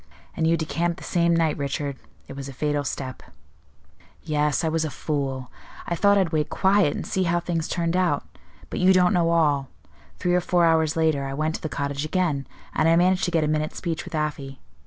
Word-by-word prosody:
"And 160 - +1
you 165 +1 +3
decamped 170 +1 -1
the - - -11
same 170 -1 +2
night, 165 -3 +1
Richard; 140 0 -2 0.3
it - - -9
was 140 0 -6
a - - -8
fatal 145 +2 -1
step." 130 -1 -5 1.0
"Yes, 150 -1 0
I - - +1
was 160 0 0
a 155 - -2
fool. 135 -2 -3 0.3
I - - -2
thought 200 +4 +4
I'd 185 -4 +2
wait 155 -2 0
quiet, 190 -5 +3
and - - -4
see 190 - -1
how 170 0 +2
things 170 -2 -2
turned 170 -1 -1
out; 180 -6 +1 0.5
but - - -3
you 185 +1 +5
don't 180 -1 +4
know 170 -2 +2
all. 145 -5 +2 0.5
Three 180 - 0
or 180 - +3
four 175 -1 +2
hours 160 -1 +3
later, 160 -4 +1
I 135 0 -4
went 155 +2 -1
to - - -5
the 155 - -3
cottage 140 +1 -3
again, 155 -4 -1 0.3
and 160 - +2
I 165 - +5
managed 180 +2 +3
to 175 - -2
get 165 -3 +2
a - - +1
minute's 155 0 -1
speech 165 -3 -3
with - - -7
Afy. 145 -3 -3
160 Hz, 220 wpm, -24 LUFS, 145-170 Hz, 1.0 s, you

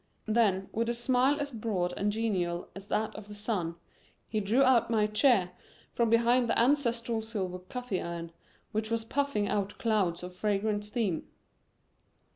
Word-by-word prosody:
Then, 210 -4 +2
with 230 +1 -1
a 240 - 0
smile 255 +4 +2
as 285 0 -3
broad 210 -6 -1
and 205 +1 0
genial 185 -6 -1
as 195 +1 -9
that 220 +1 -1
of 210 -1 -9
the 210 - -9
sun, 205 -6 -2 0.5
he 215 - -1
drew 220 +7 +3
out 255 -4 +4
my 220 -2 +3
chair 210 -4 +3 0.4
from 235 -1 +2
behind 235 +1 +4
the - - +2
ancestral 235 -3 +2
silver 195 -5 -3
coffee 210 +1 -4
urn, 170 -1 -5 0.4
which 220 0 -2
was 230 -1 -1
puffing 280 -5 0
out 205 0 -1
clouds 195 -7 +1
of 180 0 -7
fragrant 205 +1 0
steam. 210 -6 -1
215 Hz, 160 wpm, -30 LUFS, 195-235 Hz, 0.5 s, out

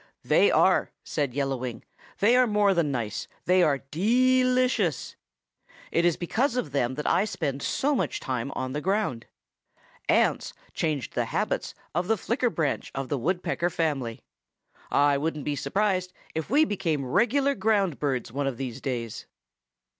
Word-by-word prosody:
"They - - +4
are," - - +3
said 140 -4 -2
Yellow 135 -2 0
Wing. 125 -2 -6 0.3
"They 225 +5 +4
are 255 0 +5
more 205 -2 +3
than 170 -4 +1
nice 115 -5 -3 0.2
they 185 +1 +4
are 150 -5 +3
de 255 +9 +3
li 255 0 +3
cious. 195 - -1 0.8
It 170 - +2
is 175 -2 +3
because 235 - 0
of 175 - -2
them 130 -2 0
that 150 - -4
I 190 - +3
spend 160 -10 -3
so 285 - 0
much 270 - -1
time 130 0 -3
on 130 0 -3
the 150 - -2
ground. 190 - -1 0.8
Ants - - +2 0.2
changed 150 -6 -2
the - - 0
habits - - -2 0.2
of 175 +3 -1
the 225 +1 +2
Flicker 240 +4 0
branch 160 -9 -2
of 135 -1 -3
the 145 - 0
Woodpecker 175 +3 0
family. 140 -9 -2 0.7
I 145 -1 +3
wouldn't 150 -1 -3
be 145 - -1
surprised 185 +5 0 0.2
if 160 +1 -3
we 295 +6 +5
became 165 - -1
regular 270 - +2
ground 200 - +1
birds 130 -5 -1
one 140 +2 -2
of 130 -3 -3
these 130 -4 -5
days." 120 -5 -4
165 Hz, 165 wpm, -26 LUFS, 135-210 Hz, 0.8 s, are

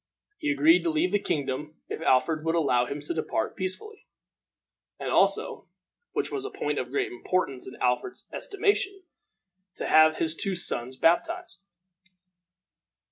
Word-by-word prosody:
He 300 - -1
agreed 320 +4 +5
to 340 - +1
leave 320 +3 +1
the 205 - +3
kingdom 150 -2 -3
if - - -5
Alfred 155 +3 +2
would 165 +1 0
allow 125 -7 +2
him 145 +3 -5
to 150 - -4
depart 155 -8 -2
peaceably, 190 - -6 0.9
and - - -3
also, - - +1 0.5
which - - -1
was 405 -2 -3
a 410 - -4
point - - -2
of - - -4
great 405 -1 -1
importance 185 - -2
in 130 - -9
Alfred's 125 - -1
estimation, 395 -1 0 0.7
to - - -4
have 155 0 +6
his 160 0 -1
two 195 +3 +1
sons 130 -7 -2
baptized. 335 - +1
170 Hz, 145 wpm, -27 LUFS, -, 0.9 s, have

